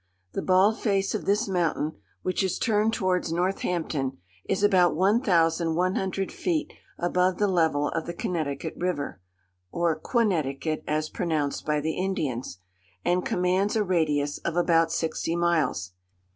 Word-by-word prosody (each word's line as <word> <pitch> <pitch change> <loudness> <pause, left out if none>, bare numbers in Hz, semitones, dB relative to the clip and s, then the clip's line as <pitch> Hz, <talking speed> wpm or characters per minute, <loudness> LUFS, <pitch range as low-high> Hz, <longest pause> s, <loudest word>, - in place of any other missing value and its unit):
The - - -3
bald 190 +4 +3
face 195 -3 +1
of 215 - -3
this 210 +3 +2
mountain, 170 -4 0 0.3
which 185 +1 0
is 185 -1 0
turned 215 -1 +2
towards 185 -6 0
Northampton, 165 -6 -1 0.3
is 200 - -1
about 185 -5 +4
one 200 +7 +3
thousand 165 -4 +2
one 185 +2 +1
hundred 190 0 -2
feet 325 -4 -2 0.2
above 180 +1 +1
the 205 - +2
level 160 -6 +2
of 160 - -3
the 170 - -3
Connecticut 160 - -3
river, 155 - -3 0.5
(or 170 -2 +1
Quonnecticut, 155 - 0
as 155 +1 0
pronounced 155 -6 -2
by 150 -1 +2
the 160 +2 -1
Indians,) 145 - -2 0.5
and 180 +1 +2
commands 185 +4 +1
a 215 - +2
radius 150 -6 0
of 170 - -3
about 165 -2 +3
sixty 165 +1 -1
miles. 160 - +1
175 Hz, 145 wpm, -26 LUFS, 155-190 Hz, 0.5 s, about